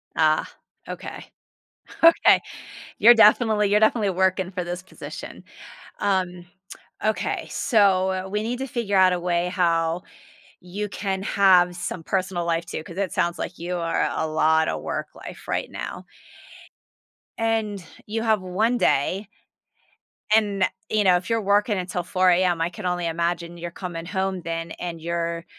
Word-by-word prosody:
Ah, 155 -1 +2 0.4
okay. - - -7 0.8
Okay. 330 0 +6 0.6
You're 240 +2 +8
definitely 215 -2 +4
you're 210 - +4
definitely 215 -2 +3
working 185 0 +1
for 180 -1 -4
this 175 +1 -5
position. 190 - -9 0.6
Um, 180 -3 -1 0.6
okay, 215 0 -1
so 190 -4 +2
we 210 +1 -1
need 240 +2 -3
to 270 - -2
figure 225 -5 -1
out 185 -1 +6
a 175 - -1
way 175 0 0
how 170 -2 0 0.6
you 200 +4 -5
can 195 -1 -3
have 185 -3 +4
some 175 -1 -5
personal 185 -1 -2
life, 170 0 -1
too, 155 - -6
'cause 170 +2 -11
it 195 -2 -1
sounds 170 0 0
like 175 - -5
you 175 +1 -3
are 165 -1 0
a 160 - -1
lot 160 0 +2
of - - -3
work-life - - -7
right - - -2
now. - - -7 1.3
And 220 -4 -1 0.2
you 225 +2 -3
have 220 -3 +2
1 215 +7 0
day. 190 +4 +1 1.1
And, 200 -3 +2 0.3
you 215 -1 +2
know, 185 -2 +5
if 175 +5 -7
you're 230 -1 +1
working 205 +1 +2
until 180 -1 -3
4 185 +1 +2
AM, 175 -1 +2
I 165 - +1
can 185 +2 -9
only 175 -1 -1
imagine 170 +1 -2
you're 170 0 -6
coming 170 -2 -6
home 190 0 -2
then, 165 0 -4
and 170 -2 -5
you're 170 0 -3
185 Hz, 150 wpm, -24 LUFS, 170-205 Hz, 1.3 s, You're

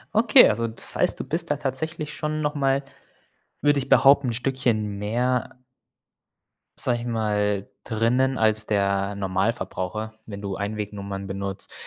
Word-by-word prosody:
Okay, 220 0 +7
also, 115 +2 0
das 110 - -3
heißt, - - +1
du - - -2
bist - - -2
da - - +1
tatsächlich 150 +3 -3
schon 155 0 -3
noch 150 0 -1
mal, 135 0 +1 0.8
würde 145 -1 +3
ich 135 -1 -3
behaupten, 140 -1 +6
'n - - 0
Stückchen 115 -5 -1
mehr 125 +4 -1 1.2
sage 120 -1 +1
ich 120 - -6
mal, 105 -3 0 0.2
drinnen 125 +4 +1
als 110 -1 +2
der 100 -1 0
Normalverbraucher, 100 +1 -2
wenn 100 -1 -8
du 100 -1 -3
Einwegnummern 100 -1 -4
benutzt. 100 0 -4
110 Hz, 140 wpm, -24 LUFS, 100-130 Hz, 1.2 s, Okay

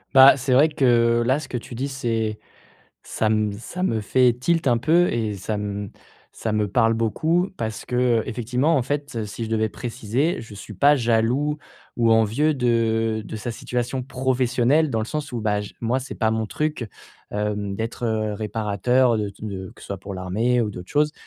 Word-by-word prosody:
Bah 135 +1 +9
c'est 130 0 0
vrai 145 +5 +6
que, 120 -4 +3
là 130 +4 +2
ce 155 - -8
que 125 - -3
tu 120 +1 -8
dis 130 +4 -2
c'est 115 -5 -2 0.6
ça 110 - -1
me 110 -1 +1
ça 120 - -6
me 115 -12 +1
fait 125 +4 +3
tilt 160 +7 0
un 120 -2 +4
peu 170 +8 +3
et 110 -3 -1
ça 100 +3 -4
m 105 -1 -4 0.4
ça 110 - -3
me 105 -1 +1
parle 115 +2 +3
beaucoup. 160 - +1
Parce 110 -1 -4
qu'effectivement, 125 +3 +1
en 140 - +3
fait, 140 -4 -3
si 105 +3 -5
je 110 - -6
devais 110 -1 +1
préciser, 125 - -2
je 115 -2 -10
suis 100 +2 -9
pas 140 +9 +4
jaloux 120 +5 +1 0.4
ou 115 -1 +3
envieux 115 +8 +3
de 115 -3 +1
de 105 - -7
sa 120 +3 -4
situation 125 +2 -3
professionnelle 130 +3 +1
dans 115 -5 -1
le - - -1
sens 150 +3 -4
où 120 -2 -3
bah, 105 -1 +1
je 105 - -8
moi, 120 +3 +1
c'est 135 - -7
pas 110 -1 +1
mon 110 0 -1
truc, 150 -1 -2 0.4
hem, 105 -1 -2
d'être, 115 +3 -4
heu, 110 -1 -1
réparateur, 110 +3 +1
de 105 -1 -1
t 100 +2 -11
de 95 -3 -5
que - - -15
ce - - -12
soit 100 - -4
pour 95 +1 -7
l'armée 110 +7 0
ou 105 - -2
d'autres 90 -2 -9
choses. 150 0 +2
115 Hz, 195 wpm, -23 LUFS, 110-130 Hz, 0.6 s, Bah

